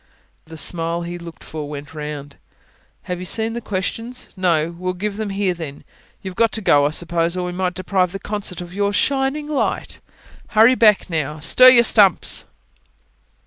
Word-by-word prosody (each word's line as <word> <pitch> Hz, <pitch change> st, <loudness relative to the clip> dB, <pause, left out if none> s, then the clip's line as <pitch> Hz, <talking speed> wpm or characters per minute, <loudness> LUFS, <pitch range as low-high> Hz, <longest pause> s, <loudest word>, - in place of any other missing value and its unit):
The 160 Hz, 0 st, -11 dB
smile 165 Hz, +2 st, -1 dB
he 175 Hz, +1 st, -6 dB
looked 170 Hz, -1 st, -11 dB
for 150 Hz, -2 st, -7 dB
went 145 Hz, 0 st, -8 dB
round. 150 Hz, -2 st, -7 dB, 0.7 s
"Have 180 Hz, -1 st, -4 dB
you 180 Hz, -, -6 dB
seen 225 Hz, +4 st, -2 dB
the 235 Hz, -, -4 dB
questions? 225 Hz, +5 st, -3 dB
no? 170 Hz, -3 st, +1 dB
Well, 185 Hz, 0 st, -2 dB
give 200 Hz, +2 st, -4 dB
them 215 Hz, -1 st, -3 dB
here 195 Hz, -1 st, 0 dB
then. 160 Hz, -5 st, -8 dB, 0.4 s
You've 190 Hz, -1 st, -6 dB
got 230 Hz, +2 st, +2 dB
to -, -, 0 dB
go, 145 Hz, -7 st, +4 dB
I -, -, -1 dB
suppose, 170 Hz, +2 st, 0 dB
or 180 Hz, -, -2 dB
we 180 Hz, -, -3 dB
might 180 Hz, 0 st, -2 dB
deprive 185 Hz, -1 st, 0 dB
the 195 Hz, -, -5 dB
concert 195 Hz, -3 st, -3 dB
of 175 Hz, 0 st, -9 dB
your 200 Hz, +1 st, 0 dB
shining 275 Hz, +5 st, 0 dB
light. 295 Hz, -2 st, -2 dB, 0.6 s
Hurry 225 Hz, +4 st, +7 dB
back, 220 Hz, -5 st, +4 dB
now. 155 Hz, -4 st, -3 dB
Stir 255 Hz, +11 st, +7 dB
your 240 Hz, -2 st, +6 dB
stumps!" 205 Hz, -6 st, +3 dB
180 Hz, 180 wpm, -20 LUFS, 165-210 Hz, 0.7 s, Hurry